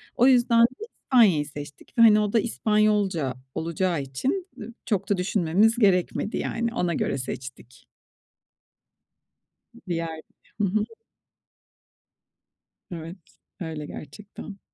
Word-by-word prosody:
O 250 Hz, -, +5 dB
yüzden 240 Hz, -2 st, +5 dB
de 255 Hz, -, 0 dB, 0.2 s
İspanya'yı 200 Hz, -, +4 dB
seçtik 145 Hz, 0 st, -10 dB
ve, -, -, +5 dB
hani, 215 Hz, -2 st, +8 dB
o 210 Hz, 0 st, -1 dB
da 230 Hz, -, +5 dB
İspanyolca 210 Hz, -, +1 dB, 0.2 s
olacağı 170 Hz, -1 st, -1 dB
için, 270 Hz, -, -3 dB
ı 230 Hz, +3 st, -8 dB
çok 200 Hz, -3 st, -1 dB
da 200 Hz, -, +2 dB
düşünmemiz 195 Hz, +4 st, +2 dB
gerekmedi 195 Hz, +1 st, +1 dB
yani. 235 Hz, 0 st, -2 dB
Ona 175 Hz, -6 st, 0 dB
göre 140 Hz, -, -1 dB
seçtik. 130 Hz, -1 st, -8 dB, 2.0 s
Diğer. 165 Hz, -2 st, -3 dB, 0.4 s
Hı -, -, +1 dB
hı. 210 Hz, +3 st, 0 dB, 2.1 s
Evet. 165 Hz, +2 st, -7 dB, 0.4 s
Öyle 160 Hz, -3 st, -5 dB
gerçekten. 195 Hz, +7 st, -10 dB
195 Hz, 110 wpm, -25 LUFS, 160-220 Hz, 2.1 s, hani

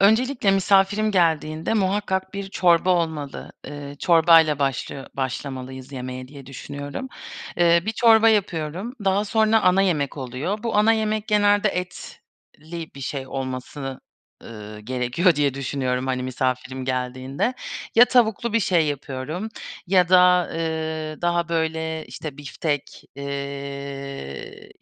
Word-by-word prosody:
Öncelikle 220 Hz, +2 st, +3 dB
misafirim 195 Hz, +2 st, +3 dB
geldiğinde 160 Hz, -1 st, +1 dB
muhakkak 190 Hz, -1 st, 0 dB
bir 200 Hz, 0 st, -4 dB
çorba 180 Hz, -1 st, +3 dB
olmalı. 160 Hz, -5 st, -2 dB
Iıı, 145 Hz, -1 st, -8 dB
çorbayla 165 Hz, -3 st, +5 dB
başlıyo 135 Hz, 0 st, -2 dB
başlamalıyız 130 Hz, 0 st, -5 dB
yemeğe 130 Hz, -1 st, -6 dB
diye 140 Hz, -1 st, -12 dB
düşünüyorum. 145 Hz, -, -6 dB, 0.5 s
Eee, 170 Hz, -1 st, +4 dB
bir 220 Hz, -, 0 dB
çorba 225 Hz, -1 st, +6 dB
yapıyorum, 190 Hz, -, -1 dB
daha 195 Hz, +2 st, +2 dB
sonra 220 Hz, +1 st, +3 dB
ana 185 Hz, +1 st, +4 dB
yemek 150 Hz, -8 st, 0 dB
oluyor. 140 Hz, -, -3 dB
Bu 230 Hz, -3 st, -1 dB
ana 215 Hz, +2 st, +5 dB
yemek 215 Hz, -1 st, -1 dB
genelde 205 Hz, 0 st, +4 dB
etli 170 Hz, -3 st, -8 dB
bir 140 Hz, -, -10 dB
şey 135 Hz, 0 st, -4 dB
olmasını, 130 Hz, +1 st, -5 dB, 0.4 s
ııı, 105 Hz, -1 st, -9 dB
gerekiyor 125 Hz, -, +1 dB
diye 145 Hz, -2 st, +1 dB
düşünüyorum, 130 Hz, -1 st, -2 dB
hani, 130 Hz, -1 st, -1 dB
misafirim 130 Hz, +1 st, -2 dB
geldiğinde. 130 Hz, -, -2 dB, 0.4 s
Ya 235 Hz, -, +9 dB
tavuklu 235 Hz, -2 st, +2 dB
bir 230 Hz, -, +3 dB
şey 175 Hz, -6 st, +2 dB
yapıyorum 145 Hz, +7 st, -4 dB, 0.4 s
ya 180 Hz, -1 st, +4 dB
da, 180 Hz, -1 st, +5 dB
eee, 160 Hz, -1 st, -3 dB
daha, 175 Hz, 0 st, +1 dB
böyle, 160 Hz, -1 st, -2 dB
işte, 140 Hz, +3 st, -8 dB
biftek, 145 Hz, 0 st, -4 dB
eee, 140 Hz, -, -6 dB
160 Hz, 125 wpm, -23 LUFS, 135-195 Hz, 0.5 s, Ya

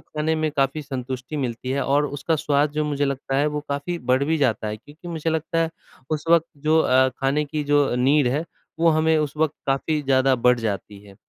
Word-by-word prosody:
खाने 155 Hz, +1 st, -2 dB
में 155 Hz, -1 st, 0 dB
काफ़ी 140 Hz, +3 st, +1 dB
संतुष्टि 130 Hz, +1 st, -5 dB
मिलती 125 Hz, -1 st, -3 dB
है 140 Hz, +1 st, 0 dB
और 145 Hz, +2 st, +2 dB
उसका 145 Hz, +3 st, -1 dB
स्वाद 145 Hz, 0 st, +1 dB
जो 150 Hz, 0 st, -1 dB
मुझे 145 Hz, -1 st, 0 dB
लगता 135 Hz, -1 st, -2 dB
है, 145 Hz, +2 st, +2 dB
वो 150 Hz, 0 st, -2 dB
काफ़ी 145 Hz, +5 st, -3 dB
बढ़ 135 Hz, +2 st, +3 dB
भी 160 Hz, +2 st, +1 dB
जाता 120 Hz, -6 st, +1 dB
है। 105 Hz, -, -4 dB
क्योंकि 150 Hz, +9 st, -13 dB
मुझे 165 Hz, -1 st, -2 dB
लगता 160 Hz, +1 st, -1 dB
है 165 Hz, -, -1 dB, 0.4 s
उस 155 Hz, -1 st, -2 dB
वक़्त 165 Hz, -1 st, +5 dB
जो 155 Hz, +3 st, +2 dB
अ, 130 Hz, -1 st, +4 dB
खाने 140 Hz, +3 st, -1 dB
की 150 Hz, +1 st, -3 dB
जो 145 Hz, -1 st, +3 dB
नीड 135 Hz, +3 st, +3 dB
है 145 Hz, +6 st, -1 dB, 0.4 s
वो 170 Hz, -, +5 dB
हमें 160 Hz, 0 st, +3 dB
उस 150 Hz, 0 st, -2 dB
वक़्त 155 Hz, -1 st, +1 dB
काफ़ी 140 Hz, +3 st, 0 dB
ज़्यादा 135 Hz, -1 st, +3 dB
बढ़ 125 Hz, -1 st, +5 dB
जाती 105 Hz, -2 st, -4 dB
है। 100 Hz, -1 st, -15 dB
145 Hz, 220 wpm, -23 LUFS, 135-155 Hz, 0.4 s, वक़्त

